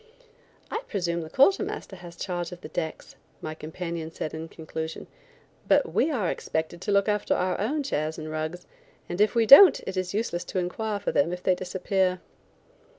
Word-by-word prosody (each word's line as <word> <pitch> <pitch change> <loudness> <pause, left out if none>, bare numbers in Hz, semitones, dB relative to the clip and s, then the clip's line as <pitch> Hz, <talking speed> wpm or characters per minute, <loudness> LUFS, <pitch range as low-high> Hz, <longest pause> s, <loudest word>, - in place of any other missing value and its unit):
"I 445 - -2
presume 170 -4 -1
the 160 - -7
quarter 280 - +4
master 410 - -5
has 175 -1 -11
charge 175 -1 -4
of 180 0 -10
the 155 - -9
decks," 160 -1 -5 0.2
my 155 - -5
companion 160 +1 -5
said 160 -1 -5
in 160 +1 -5
conclusion, 160 0 -6 0.6
"but - - +3
we - - +3
are 220 - 0
expected 160 +2 -3
to 205 - -2
look 200 0 +3
after 210 -1 +1
our 180 0 -1
own 285 +9 -1
chairs 155 - -2
and 155 -1 -6
rugs, 155 +3 -4 0.4
and 175 +3 -2
if 215 +3 +3
we 230 -1 +4
don't 280 - +10
it 190 - -4
is 185 -1 -1
useless 195 -5 -1
to - - -5
inquire 205 +4 -2
for 200 - -2
them 155 +4 +2
if 180 0 -5
they 185 - +4
disappear." 185 0 -1
180 Hz, 190 wpm, -26 LUFS, 160-205 Hz, 0.6 s, don't